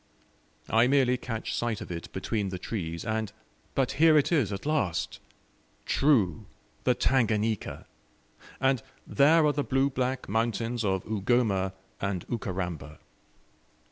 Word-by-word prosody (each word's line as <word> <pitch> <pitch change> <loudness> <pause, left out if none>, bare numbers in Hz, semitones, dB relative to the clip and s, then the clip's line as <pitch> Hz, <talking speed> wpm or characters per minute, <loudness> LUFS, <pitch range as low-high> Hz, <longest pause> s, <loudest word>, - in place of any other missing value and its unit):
I 115 +2 +4
merely 130 -2 +3
catch 120 -3 -4
sight 115 -3 -1
of 105 - -8
it 85 -1 -6
between 100 +1 -2
the 95 - -4
trees, 85 -3 -4
and 110 -2 -1 0.4
but 135 -2 +1
here 160 -1 +7
it 145 - +2
is 140 - +2
at 100 +4 -5
last! 140 - -1 0.7
True 110 - +2 0.4
THE 125 - +4
TANGANIKA! 110 -5 0 0.7
and 135 -2 +2 0.2
there 155 +3 +4
are 150 - +3
the 145 - 0
blue 135 +1 +1
black 130 0 -2
mountains 115 +2 -1
of 95 -2 0
Ugoma 105 -3 +1 0.3
and 100 -3 -2
Ukaramba. 90 - -4
115 Hz, 130 wpm, -28 LUFS, 95-130 Hz, 0.7 s, here